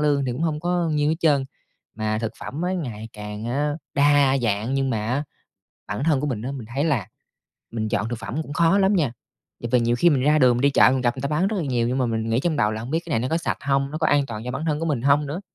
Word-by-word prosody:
lương 145 -2 +2
thì 125 - -1
cũng 130 - -4
hông 155 -2 -1
có 175 0 0
nhiêu 150 -1 +1
hết 160 - +1
trơn, 145 -5 +3 0.5
mà 110 0 -1
thực 115 0 -3
phẩm 150 - -6
á 180 +1 0
ngày 115 - -5
càng 105 0 -7
á, 145 +5 0 0.2
đa 140 -1 +4
dạng, 110 +2 0
nhưng 135 -1 0
mà 110 -3 -1
á, 130 +5 0 0.6
bản 105 +6 -3
thân 150 -4 +2
của 150 - -1
mình 115 -6 -3
á, 125 +4 -4
mình 135 -5 -7
thấy 140 - +1
là 140 - 0 0.6
mình 110 -2 -3
chọn 105 +1 -1
thực 120 -1 -4
phẩm 115 +8 -4
cũng 145 - -9
khó 170 +5 +3
lắm 195 +1 +3
nha. 150 -10 +1 0.5
Tại 120 - -3
vì 125 - +5
nhiều 120 +1 +1
khi 170 +7 +4
mình 135 -3 +2
ra 150 +2 +4
đường 125 -3 +5
mình - - -1
đi 140 - +4
chợ, 130 - +6
mình 130 - 0
gặp 125 +1 0
người 130 - -6
ta 140 - -1
bán 155 +5 +1
rất 215 +1 -1
là 180 - -1
nhiều 120 -4 0
nhưng 130 - -1
mà 125 - +1
mình 115 -1 -2
nghĩ 115 +2 +2
trong 160 0 0
đầu 105 -5 +2
là 110 - -4
hông 120 +3 -7
biết 160 - +1
cái - - -8
này 115 - +1
nó 125 - -2
có 160 - +1
sạch 165 - -2
hông, 135 0 0
nó 155 - -4
có 155 - +1
an 145 -1 +3
toàn 110 -3 -6
cho 125 - -4
bản 135 +4 -4
thân 150 -1 0
của 165 - -1
mình 140 -7 -1
hông 145 +2 +3
nữa? 150 +6 -4
135 Hz, 310 wpm, -23 LUFS, 120-150 Hz, 0.6 s, chợ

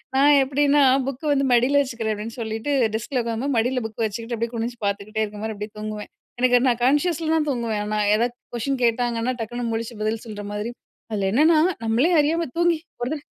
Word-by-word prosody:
நான் 285 +2 +6
எப்பிடின்னா, 285 +1 +3 0.2
புக்க 275 +2 -5
வந்து 275 -1 +1
மடில 250 +4 +4
வச்சுக்கிறேன் 230 -5 -2
அப்டின்டு 220 +3 -7
சொல்லிட்டு 225 +5 -3 0.2
டெஸ்க்ல 245 +4 -1
உக்காரும்போது 235 +4 -2
மடில 250 +3 +1
புக்க 220 - -17
வச்சுக்கிட்டு, 230 +3 -4
அப்டியே 230 +1 -2
குனிஞ்சு 235 +1 -3
பாத்துக்கிட்டே 205 +2 -1
இருக்கமாரி 210 +1 -6
அப்டியே 210 +1 -6
தூங்குவேன். 215 0 -6 0.3
எனக்கு 245 0 +5
நான் 240 -1 0
கான்ஷியஸ்ல 315 +4 +1
தான் 310 -1 +1
தூங்குவேன். 230 -5 -1
ஆனா, 215 0 -1 0.2
ஏதா 235 +3 +2 0.3
கொஸ்டின் 260 +2 -2
கேட்டாங்கன்னா, 235 +1 0
டக்குனு 240 +1 -3
முழிச்சு 225 0 -4
பதில் 220 +2 -2
சொல்றமாதிரி 205 +1 -5 0.4
அதில 200 -3 0
என்னென்னா 310 +8 +5 0.3
நம்மளே 230 +8 +2
அறியாம 325 +3 +2
தூங்கி 345 -1 +3 0.2
ஒரு 240 - -1
தட 295 -2 -6
235 Hz, 175 wpm, -23 LUFS, 220-275 Hz, 0.4 s, நான்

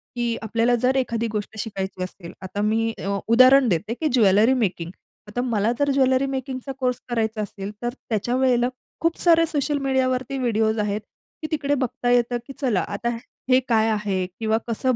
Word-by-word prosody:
की 235 -1 -1
आपल्याला 230 +2 +1
जर 255 +1 +2
एखादी 235 -3 0
गोष्ट 215 0 -4
शिकायची 190 -3 -4
असेल, 180 -1 -8
आता 190 +2 -4
मी 225 +2 +1
अ, 200 0 -2
उदाहरण 255 +3 +6
देते, 205 +5 -1
की 310 +6 -2
ज्वेलरी 215 +1 +5
मेकिंग 185 -8 -1 0.4
आता 215 +4 -3
मला 230 -3 +1
जर 285 0 +2
ज्वेलरी 265 -1 +3
मेकिंगचा 265 0 -4
कोर्स 250 -2 0
करायचा 220 -2 -1
असेल, 200 -1 -6
तर 240 0 -2 0.2
त्या 240 +5 -2
वेळेला 250 -2 +2 0.3
खूप 330 0 +1
सारे 330 -1 +5
सोशल 295 -2 -1
मीडियावरती 265 -1 0
व्हिडिओज 220 -3 +1
आहेत, 210 0 -1 0.4
की 310 - -3
तिकडे 290 -2 0
बघता 250 -2 -2
येतं, 245 0 +2
की 275 - -8
चला 240 -9 +1
आता 205 +4 -3 0.4
हे 255 - +6
काय 225 -1 +3
आहे? 205 -4 -1
किंवा 220 -1 +1
कसं 250 +2 0
235 Hz, 175 wpm, -23 LUFS, 215-260 Hz, 0.4 s, उदाहरण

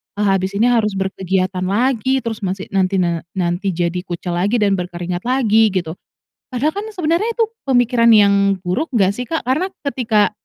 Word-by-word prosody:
eee, 205 - -1
habis 195 -1 0
ini 235 +4 +3
harus 215 -4 +1
berkegiatan 190 -1 -1
lagi, 255 +5 +1
terus 225 -2 -4
masih 190 -1 -4
nanti 195 0 +1
na 170 -3 +1 0.2
nanti 180 +1 -1
jadi 175 +1 -1
kucel 175 0 -3
lagi 200 +6 +1
dan 200 -4 +2
berkeringat 175 +2 -5
lagi." 225 -4 +3
Gitu. 185 -5 -2 0.6
Padahal 260 +4 -1
kan 420 - -4
sebenarnya 345 +2 0
itu 455 -2 0 0.2
pemikiran 245 -2 +3
yang 200 -2 +5 0.3
buruk 185 - -1
nggak 195 -5 +3
sih, 245 +5 -5
Kak? 325 +4 -2
Karena 265 +9 0 0.2
ketika 235 -7 +1
205 Hz, 170 wpm, -18 LUFS, 185-245 Hz, 0.6 s, yang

